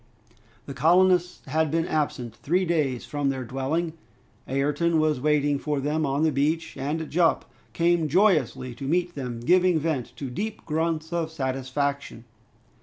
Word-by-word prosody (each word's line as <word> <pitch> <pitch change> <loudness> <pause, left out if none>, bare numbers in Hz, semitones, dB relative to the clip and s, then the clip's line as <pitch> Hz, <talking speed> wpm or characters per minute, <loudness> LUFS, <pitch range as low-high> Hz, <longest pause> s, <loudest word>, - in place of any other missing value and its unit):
The 140 - -7
colonists 180 +5 +3
had 155 +3 0
been 165 +3 0
absent 135 -7 -2
three 180 +5 0
days 150 -8 0
from 145 -1 -1
their 135 -1 -2
dwelling. 145 +7 -2 0.5
Ayrton 150 +5 +1
was 155 -4 +1
waiting 145 -1 +2
for 150 -1 -2
them 150 +2 0
on 140 +3 0
the 160 - +3
beach, 150 +4 -1
and 150 +4 -3
Jup 165 +2 +2 0.3
came 170 -1 +2
joyously 150 - +2
to 130 +3 -8
meet 175 +3 0
them, 125 -5 -5
giving 180 +5 +4
vent 150 -5 -2
to 135 -3 -6
deep 215 - -5
grunts 160 +1 -1
of 165 -2 -1
satisfaction. 135 -2 -3
150 Hz, 150 wpm, -25 LUFS, 135-165 Hz, 0.5 s, giving